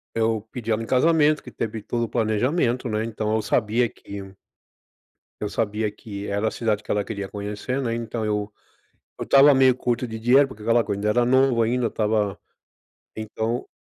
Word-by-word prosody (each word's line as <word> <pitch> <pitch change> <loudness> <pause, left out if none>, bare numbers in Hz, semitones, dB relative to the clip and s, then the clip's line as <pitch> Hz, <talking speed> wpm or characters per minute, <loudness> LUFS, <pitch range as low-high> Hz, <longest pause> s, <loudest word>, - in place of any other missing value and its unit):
eu 110 -1 +1
pedi 115 -3 -4
ela 110 +1 +1
em 115 - -6
casamento, 150 +2 +3
que 125 - -10
teve 110 -2 -4
todo 120 +1 -2
o - - -9
planejamento, 120 +3 0
né? 110 0 -1
Então 110 -1 -2
eu 110 - +1
sabia 115 +2 +1
que 100 -2 -10 1.1
Eu 105 - -3
sabia 105 -1 -1
que 100 -1 -8
era 100 +2 0
a - - -3
cidade 110 -3 -1
que - - -13
ela 105 -1 +1
queria 100 -3 -5
conhecer, 105 +6 -4
né, 115 -3 -1
então 115 -1 -4
eu, 105 -1 -1 0.7
eu - - -3
estava 140 +1 +6
meio 130 -1 +5
curto 125 0 -1
de 110 -1 -6
dinheiro, 130 +5 +5
porque 110 -5 -12
aquela 115 +1 +3
coisa, 100 - -3
ainda 105 +1 -1
era 120 +3 +3
novo, 130 -1 +3
ainda 120 +2 +1
estava 105 -2 0 0.8
então 110 +2 -3
115 Hz, 185 wpm, -24 LUFS, 105-125 Hz, 1.1 s, estava